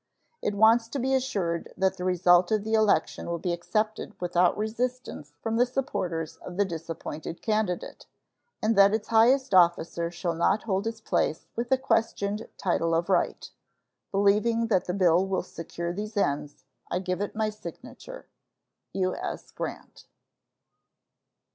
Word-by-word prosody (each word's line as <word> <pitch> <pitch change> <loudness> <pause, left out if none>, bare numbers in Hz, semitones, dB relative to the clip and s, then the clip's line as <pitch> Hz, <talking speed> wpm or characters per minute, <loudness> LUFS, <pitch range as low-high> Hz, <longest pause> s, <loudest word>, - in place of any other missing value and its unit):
It 205 - -1
wants 225 +2 +5
to 275 - -4
be 265 +2 0
assured 200 -11 -1
that 190 0 +1
the 180 - -5
result 180 0 +4
of 215 -2 +2
the 220 +1 -3
election 215 -7 +2
will 170 0 -2
be 175 +1 -2
accepted 215 +5 -2
without 175 0 +2
resistance 225 - -3
from 225 0 -1
the 245 - +5
supporters 180 - -3
of 180 - -9
the 205 - +3
disappointed 165 -2 -6
candidate, 215 -5 -2 0.6
and 220 +1 +2
that 200 +1 +6
its 220 - -4
highest 245 +3 +4
officer 170 -1 +3
shall 170 0 -3
not 170 +6 +1
hold 195 -1 -1
his 225 0 -4
place 155 - 0
with 235 +2 -3
a 265 - +5
questioned 225 -4 -1
title 165 -3 +1
of 170 +3 0
right. 190 - 0 0.6
Believing 210 +4 +2
that 190 -5 +2
the 180 - -2
bill 180 -2 +4
will 190 -1 -1
secure 170 +1 -5
these 210 +3 -5
ends, 145 -5 -1 0.2
I - - 0
give 185 +1 -2
it 205 - -3
my 215 -1 0
signature. - - -10 0.7
U.S. 185 -1 -3
GRANT. - - -7
200 Hz, 150 wpm, -27 LUFS, 175-225 Hz, 0.7 s, that